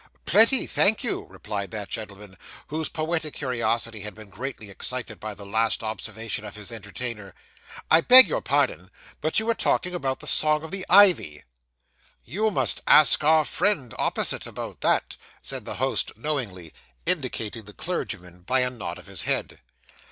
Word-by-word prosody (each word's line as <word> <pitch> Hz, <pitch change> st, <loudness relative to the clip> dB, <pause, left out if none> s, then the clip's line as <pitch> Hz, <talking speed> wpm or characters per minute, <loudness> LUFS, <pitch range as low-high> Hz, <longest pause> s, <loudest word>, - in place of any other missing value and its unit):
'Plenty, 230 Hz, +5 st, +4 dB
thank 215 Hz, +6 st, +2 dB
you,' 240 Hz, -, -2 dB
replied 100 Hz, -2 st, -6 dB
that 105 Hz, -2 st, -6 dB
gentleman, 105 Hz, -2 st, -8 dB, 0.3 s
whose 155 Hz, +1 st, -3 dB
poetic 160 Hz, -1 st, -2 dB
curiosity 115 Hz, -4 st, -1 dB
had 105 Hz, -1 st, -8 dB
been 110 Hz, -2 st, -13 dB
greatly 115 Hz, -3 st, -7 dB
excited 120 Hz, +1 st, -3 dB
by 110 Hz, -1 st, -6 dB
the 100 Hz, +1 st, -11 dB
last 110 Hz, +3 st, 0 dB
observation 110 Hz, 0 st, -5 dB
of 105 Hz, -1 st, -9 dB
his 105 Hz, +1 st, -8 dB
entertainer. 105 Hz, -2 st, -7 dB, 0.6 s
'I 160 Hz, -, +7 dB
beg 255 Hz, +7 st, +10 dB
your -, -, -2 dB
pardon, -, -, 0 dB, 0.3 s
but 155 Hz, -, 0 dB
you 220 Hz, -, -3 dB
were 230 Hz, -, +2 dB
talking 180 Hz, -4 st, -1 dB
about 135 Hz, -7 st, -2 dB
the -, -, -10 dB
song 155 Hz, 0 st, +3 dB
of 160 Hz, -, -8 dB
the 195 Hz, -1 st, -4 dB
Ivy.' 180 Hz, -, +5 dB, 0.8 s
'You 210 Hz, -, -1 dB
must 210 Hz, -, 0 dB
ask 150 Hz, 0 st, +7 dB
our 155 Hz, 0 st, +4 dB
friend 145 Hz, -, -1 dB
opposite -, -, 0 dB
about -, -, -8 dB
that,' -, -, 0 dB, 0.3 s
said -, -, -5 dB
the -, -, -5 dB
host -, -, 0 dB
knowingly, 110 Hz, -, -4 dB, 0.3 s
indicating 110 Hz, 0 st, +1 dB
the 105 Hz, -, -10 dB
clergyman 95 Hz, -, -5 dB
by 130 Hz, +8 st, +1 dB
a 125 Hz, 0 st, 0 dB
nod 120 Hz, -4 st, -7 dB
of -, -, -14 dB
his -, -, -5 dB
head. -, -, -2 dB
120 Hz, 165 wpm, -25 LUFS, 105-160 Hz, 0.8 s, beg